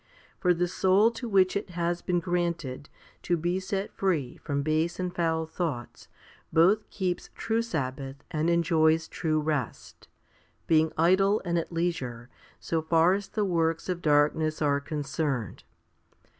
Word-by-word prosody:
For 180 - +3
the 175 +1 0
soul 190 +5 +3
to 235 +1 -6
which 190 -2 +3
it 200 -1 -2
has 175 0 -2
been 180 -1 0
granted 170 -6 -2 0.3
to 175 - 0
be 175 +3 -1
set 195 +1 -3
free 160 -10 -1
from 140 -1 -3
base 155 +4 0
and 180 -1 -2
foul 160 -1 0
thoughts 155 -7 -5 0.4
both 185 +7 +3
keeps 185 -3 -3
true 225 0 0
sabbath 135 - -4 0.2
and 160 0 0
enjoys 160 -1 +3
true 155 -2 -1
rest, 150 -5 -4 0.6
being 160 0 +3
idle 190 +5 +4
and 170 -1 +1
at 165 - -5
leisure 135 -8 -3 0.3
so 165 -1 -1
far 165 +2 +4
as 200 0 -2
the 210 -2 -1
works 165 -2 0
of 175 -1 -2
darkness 155 +1 +2
are 145 -2 +2
concerned. 140 -4 -3
165 Hz, 145 wpm, -28 LUFS, 155-180 Hz, 0.6 s, idle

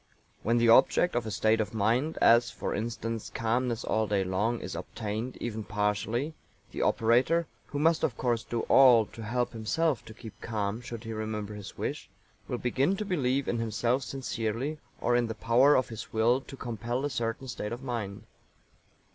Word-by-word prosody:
When 115 +2 +2
the 120 0 +3
object 130 +9 +5
of 120 -2 0
a - - -2
state 110 +2 +2
of 110 - -4
mind, 120 +9 +1
as, 120 +1 +6
for - - -4
instance, 115 0 -3
calmness 120 +1 -1
all 110 0 0
day 100 -2 +1
long, 105 +6 0
is 95 - -6
obtained, 110 +3 -4
even 110 -2 -4
partially, 105 +7 -1 0.4
the - - -4
operator 125 +9 +3 0.2
(who 145 - -5
must, 160 +2 +3
of 120 - 0
course, 120 -2 0
do 120 -1 -2
all 125 -5 +6
to 115 - -11
help 120 +3 -1
himself 125 +5 0
to 110 - -10
keep 115 -2 -11
calm, 110 0 -2
should 120 -2 -7
he 115 -1 -5
remember 110 -1 -4
his 105 -2 -9
wish) - - -4 0.4
will - - -2
begin 135 +10 +1
to 210 - -3
believe 140 -8 0
in 120 - 0
himself 115 +3 0
sincerely, 130 +2 -3 0.2
or 120 - +2
in 120 -1 +2
the 110 - -4
power 125 +6 +4
of 130 - +1
his 110 -2 -8
will 115 +4 +3
to 135 - -11
compel 120 +2 -3
a - - 0
certain 115 +2 -3
state 105 -4 -4
of 120 +3 -5
mind. 110 -6 -4
115 Hz, 185 wpm, -29 LUFS, 110-125 Hz, 0.4 s, as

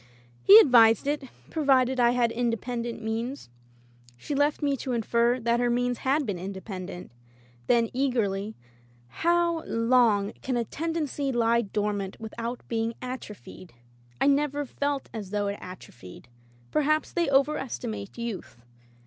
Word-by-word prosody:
"He 195 - +9
advised 225 -2 +6
it 290 -1 -1
— - - -25
^provided 265 -4 +2
I 240 -1 +5
had 240 -1 +2
inde 230 -1 -1
pendent 235 -1 -5
means." 225 - -4 0.7
She 210 - -5
left 290 +1 +1
me 285 -1 +2
to 260 0 -4
infer 235 +2 +1
that 235 0 +1
her 245 0 +1
means 245 0 0
had 280 +2 +1
been 200 -6 -3
independent; 190 -1 -7 0.6
then, 235 -1 +3
eagerly, 220 -6 -1 0.5
"How 340 - +1
long 230 -3 +2
can 255 -2 -2
a 235 - -1
tendency 300 -2 -3
lie 235 -1 +2
dormant 205 -2 -3
with 220 -1 -8
out 235 +1 -4
being 230 0 -2
atrophied? 215 - -9 0.5
Fve 280 0 +4
ntvcr 290 0 -4
felt 285 +1 -2
as 210 -4 -6
though 205 0 -1
it 200 0 -3
atrophied. 120 - -12 0.4
Perhaps 305 +1 +1
they 340 -4 +1
over 280 +2 +3
estimate 110 -4 -6
youth. 235 - -6
235 Hz, 145 wpm, -27 LUFS, 210-270 Hz, 0.7 s, He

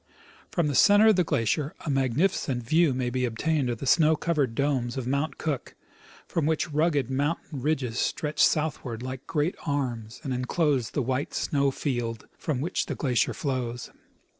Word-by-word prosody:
From 170 - 0
the 145 - 0
center 205 +8 +6
of 215 - +5
the 180 - +3
glacier 145 +2 0
a 150 - 0
magnificent 135 0 +1
view 160 +5 +3
may 125 -1 -1
be 130 0 -1
obtained 130 +3 0
of 120 - -2
the 135 - -6
snow 155 +3 +5
covered 145 -7 0
domes 135 -3 0
of 130 - -3
Mount 140 +5 -1
Cook, 145 -6 -3 0.5
from 155 -3 0
which 160 +1 0
rugged 145 -4 +1
mountain 145 +1 -2
ridges 130 -5 -1
stretch 150 -1 0
southward 135 -7 0
like 130 0 -6
great 155 +3 0
arms 125 -6 -3
and 135 -4 -2
enclose 130 0 0
the 140 - -1
white 130 +3 -2
snow 140 -1 +1
field 120 -5 -3
from 140 -5 -2
which 165 - -1
the - - -3
glacier 125 -5 +1
flows. 130 -6 -3
140 Hz, 170 wpm, -27 LUFS, 125-155 Hz, 0.5 s, center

